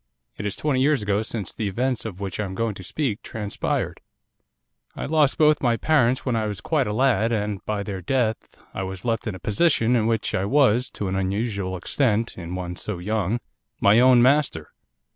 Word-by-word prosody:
It 105 - -4
is 100 - -3
twenty 140 -4 0
years 140 -4 +2
ago 100 0 +1
since 110 -4 -4
the 110 - -3
events 125 +5 -1
of 100 -4 -6
which 100 -1 -5
I 105 - 0
am 95 -1 -6
going 115 +1 -1
to 95 - -10
speak 115 - -2
transpired. 105 -2 -3 0.9
'I - - -4
lost 150 -2 +2
both 155 -2 +4
my 120 -3 +2
parents 130 -5 +2
when 125 -3 0
I 110 -1 0
was 105 -2 -4
quite 150 -5 0
a - - -1
lad, 115 -1 +2
and 105 -3 -2
by 105 -1 -1
their 100 -2 -5
death 110 +2 -1 0.2
I - - -4
was 95 +1 -6
left 115 -2 -1
in 105 - -3
a - - -9
position 115 - +2
in 110 -2 +2
which 115 -2 0
I 95 - 0
was, 125 -1 +3
to 100 - -3
an 95 - -2
unusual 95 0 -2
extent 115 +3 0
in 90 0 -6
one 90 -1 -5
so 105 -4 -4
young, 105 +4 -1 0.4
my 100 +3 +5
own 125 -1 +6
master. 130 - +2
110 Hz, 205 wpm, -24 LUFS, 100-125 Hz, 0.9 s, own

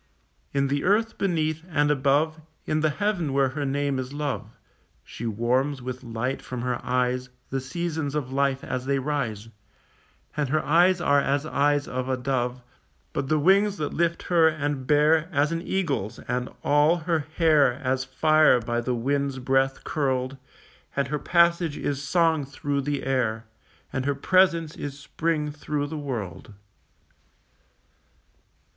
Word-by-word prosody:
In 140 0 +1
the 140 +1 0
earth 220 +4 +1
beneath, 160 -4 0
and 145 -2 +2
above 150 +3 +1 0.2
In 155 - 0
the 155 0 +2
heaven 175 -4 -1
where 135 -1 +3
her 145 +1 -3
name 140 0 0
is 130 +1 -5
love, 145 -7 -3 0.5
She 115 - -6
warms 125 +6 0
with 125 0 -6
light 120 +3 -3
from 125 -2 -6
her 125 -1 -2
eyes 125 0 0 0.2
The 135 0 -1
seasons 160 0 -3
of 135 -3 -3
life 135 -1 +1
as 130 0 -4
they 140 0 +2
rise, 130 -6 -2 0.9
And 150 -3 -1
her 155 +3 0
eyes 175 +4 +4
are 145 -4 +4
as 140 +1 0
eyes 145 -1 +1
of 130 +1 -3
a 130 - 0
dove, 125 -1 -2 0.5
But 135 - -2
the 155 +2 +2
wings 195 +6 +3
that 150 - -3
lift 170 0 0
her 170 -2 +4
and 145 -4 -2
bear 155 +3 +4
As 145 0 +2
an 165 0 -2
eagle's, 160 - -2
and 125 0 -3
all 150 +3 +4
her 170 -2 +2 0.2
hair 150 -6 +5
As 130 0 -1
fire 155 +1 +4
by 120 +1 -2
the 125 +1 -1
wind's 140 +3 -1
breath 135 +1 +1
curled, 130 -3 -1 0.6
And 140 0 0
her 150 0 -1
passage 170 -1 +2
is 140 -1 -2
song 160 +1 +2
through 140 +1 -2
the 145 0 -2
air, 115 -4 0 0.5
And 130 0 -2
her 145 - +1
presence 170 0 +2
is 140 -1 -6
spring 150 +1 -2
through 150 -1 -3
the 150 +2 -6
world. 110 - -6
140 Hz, 155 wpm, -25 LUFS, 130-155 Hz, 0.9 s, hair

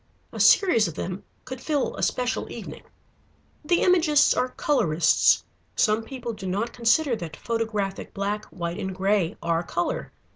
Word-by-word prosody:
A - - -8
series 240 - +5
of 165 - -7
them 185 +2 -5 0.2
could 255 0 -7
fill 295 -4 -1
a - - -6
special 250 0 -1
evening. - - -8 0.8
The 345 +3 +2
Imagists 330 -5 +4
are 255 - 0
colorists. 170 - +2 0.3
Some 215 0 +2
people 240 -1 -6
do 190 -3 -7
not 205 +6 -2
consider 240 +3 +2
that 160 -5 -7
photographic 215 -4 -3
black, 205 +2 -3
white, 170 +1 -5
and 190 -2 -4
gray 190 -2 0
are 170 0 +1
color. 175 0 -3
215 Hz, 150 wpm, -25 LUFS, 185-255 Hz, 0.8 s, series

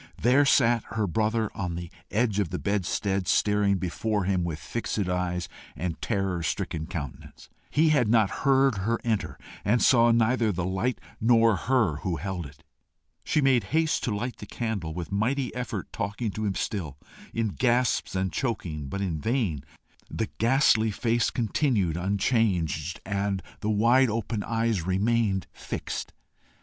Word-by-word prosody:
There 130 +5 +4
sat 120 -4 +4
her 110 -1 +1
brother 110 +3 0
on 90 -3 -3
the 85 -1 -6 0.2
edge 110 -2 +1
of 100 -5 0
the - - -3
bedstead 100 -1 -1
staring 105 0 +3
before 100 +3 -1
him 95 -1 +1
with 85 -3 -3
fixed 115 +9 -4
eyes 90 -2 -1 0.3
and 85 +2 -4
terror 95 -5 -1
stricken 80 -1 -2
countenance. 75 -9 -7 0.2
He 155 +2 +3
had 140 -7 +3
not 110 -3 +3
heard 135 -5 +3
her 115 +5 0
enter, 110 -3 -1 0.3
and 115 +4 +3
saw 120 -1 +5
neither 115 0 +3
the 90 -2 -2
light 95 +7 -1 0.2
nor 115 -1 +4
her 115 - +1
who 85 +2 -2
held 90 -3 -4
it. 70 0 -17 0.6
She 155 - +1
made 135 -4 +3
haste 160 -1 +2
to 110 - -1
light 120 +2 -3
the 105 - -9
candle, 100 -10 -3
with 90 +1 -5
mighty 125 +6 0
effort 120 -6 -5
talking 105 +2 -2
to 110 +2 -3
him 95 - -1
still, 80 -9 -3 0.3
in 115 -1 -1
gasps 120 0 +1
and 95 -2 -1
chokings, 85 - -3
but 100 - -3
in 85 -5 -2
vain; 105 - -1 0.5
the 110 - -3
ghastly 115 -2 +4
face 115 +2 +1
continued 110 - 0
unchanged, 90 - 0
and 100 -1 -1 0.2
the 105 - -2
wide 120 +5 +4
open 110 0 -2
eyes 115 -3 0
remained 95 +2 +1
fixed. - - -5
105 Hz, 155 wpm, -27 LUFS, 90-115 Hz, 0.6 s, saw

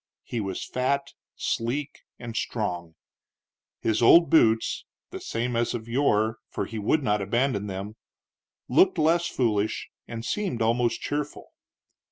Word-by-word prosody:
He 120 - -4
was 95 -2 -4
fat, 140 +2 -1 0.3
sleek, 130 +5 -2 0.2
and 115 -2 -7
strong. 90 -8 -3 0.9
His 110 0 +1
old 165 +8 +7
boots 115 -8 +3 0.3
the - - -6
same 120 +1 -2
as 120 +1 0
of 115 -1 -6
yore, 110 -3 +1
for - - -3
he 110 - -6
would 145 +9 +1
not 105 -3 +1
abandon 105 +1 0
them 100 +3 -6 0.7
looked 185 +9 +4
less 165 +2 +3
foolish 110 -4 0 0.2
and 115 0 -6
seemed 195 - -2
almost 115 +1 +1
cheerful. 145 0 -4
115 Hz, 135 wpm, -26 LUFS, 110-140 Hz, 0.9 s, old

